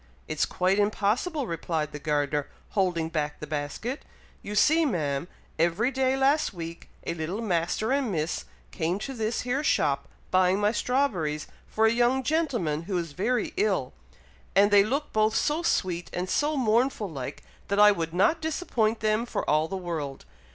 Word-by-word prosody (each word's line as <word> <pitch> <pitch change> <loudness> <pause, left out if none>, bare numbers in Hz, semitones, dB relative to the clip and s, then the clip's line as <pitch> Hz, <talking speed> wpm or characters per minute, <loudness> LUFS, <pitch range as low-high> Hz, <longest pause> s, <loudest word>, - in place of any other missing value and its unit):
"It's 155 -1 0
quite 185 +2 +1
impossible," 220 - +1
replied 160 -4 -2
the 145 - -6
gardener, 145 -1 0 0.2
holding 180 -5 0
back 150 -2 -2
the - - -5
basket. 150 - -4 0.4
"You 210 - -6
see, 315 +9 +5
ma'am, 155 - -1 0.3
every 175 +10 +2
day 265 0 +1
last 275 -4 +2
week 165 0 -7 0.2
a - - -1
little 170 +5 -4
Master 205 +2 0
and 270 -5 +1
Miss 155 - -2 0.3
came 170 +4 -1
to 270 +6 -5
this 225 -1 -1
here 250 +4 -1
shop, 140 - +1 0.2
buying 185 +1 +4
my 210 0 +3
strawberries 205 - 0 0.2
for 220 - +1
a 220 - +5
young 245 +2 +2
gentleman 245 - 0
who 190 - 0
is 170 -3 -3
very 215 - -1
ill; 420 +3 +1 0.6
and 200 +1 +5
they 200 -1 +7
look 275 +8 -2
both 215 0 +2
so 300 +3 +1
sweet 175 - 0
and 180 +1 -2
so 300 0 +1
mournful 235 -2 +2
like, 135 -7 -6 0.2
that 200 - 0
I 210 0 +8
would 165 -5 -2
not 195 - +2
disappoint 245 -9 0
them 215 +2 +1
for - - -3
all 155 +1 +3
the 195 - -4
world. 160 - -5
200 Hz, 170 wpm, -27 LUFS, 165-250 Hz, 0.6 s, I